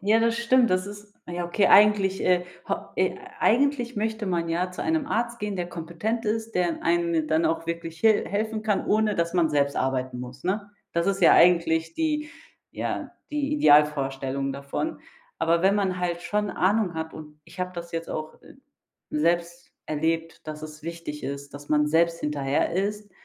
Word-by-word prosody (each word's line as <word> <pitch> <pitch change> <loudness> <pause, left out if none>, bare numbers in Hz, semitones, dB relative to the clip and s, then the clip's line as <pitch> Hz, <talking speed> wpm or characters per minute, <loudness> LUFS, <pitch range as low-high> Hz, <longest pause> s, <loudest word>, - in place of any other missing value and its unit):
Ja, 215 +3 +3
das 230 0 +2
stimmt, 235 0 +3
das 185 +1 +1
ist 205 0 -10 0.2
ja, 175 0 -3
okay, 190 +4 +2
eigentlich, 200 -2 +5
äh, 180 -1 +3 0.2
ho - - +2 0.2
äh, - - +1 0.2
eigentlich 255 0 +2
möchte 220 0 -2
man 170 -2 -1
ja 180 +2 -1
zu 180 - -8
einem 320 -3 0
Arzt 235 -2 -2
gehen, 205 -2 -3
der 175 -1 -3
kompetent 175 +8 -3
ist, 225 +1 -2
der 180 -1 +2
in 170 - -4
einem 170 -2 +1
dann 160 +1 +2
auch 165 +1 0
wirklich 165 -1 -5
hil 220 -2 +4
helfen 215 +1 -2
kann, 210 -2 0
ohne 215 0 +2
dass 170 +1 -1
man 165 -3 +3
selbst 140 -1 +1
arbeiten 130 -1 -1
muss, 125 +2 -9
ne? 205 +2 -2 0.2
Das 170 +2 0
ist 195 0 0
ja - - +7
eigentlich 165 -2 +4
die 300 -2 -1 0.4
ja, - - -4 0.2
die 295 -1 -1
Idealvorstellung 140 - +3
davon. 140 - -4 0.4
Aber 170 +1 +2
wenn 195 +1 +4
man 190 -3 0
halt 175 -1 -2
schon 210 +4 -1
Ahnung 190 0 +1
hat, 160 0 -4
und 150 -1 -11
ich 180 - -16
habe 180 0 -2
das 170 -1 -7
jetzt 165 0 -4
auch, 155 0 -5
äh, - - -15 0.6
selbst 170 +3 -1
erlebt, 165 +2 -2
dass 155 0 -6
es 155 0 -9
wichtig 165 -2 -6
ist, 140 +1 -6
dass 145 0 -10
man 150 0 +3
selbst 165 +2 +2
hinterher 145 -2 0
ist, 205 +3 -2
175 Hz, 185 wpm, -25 LUFS, 160-210 Hz, 0.6 s, ja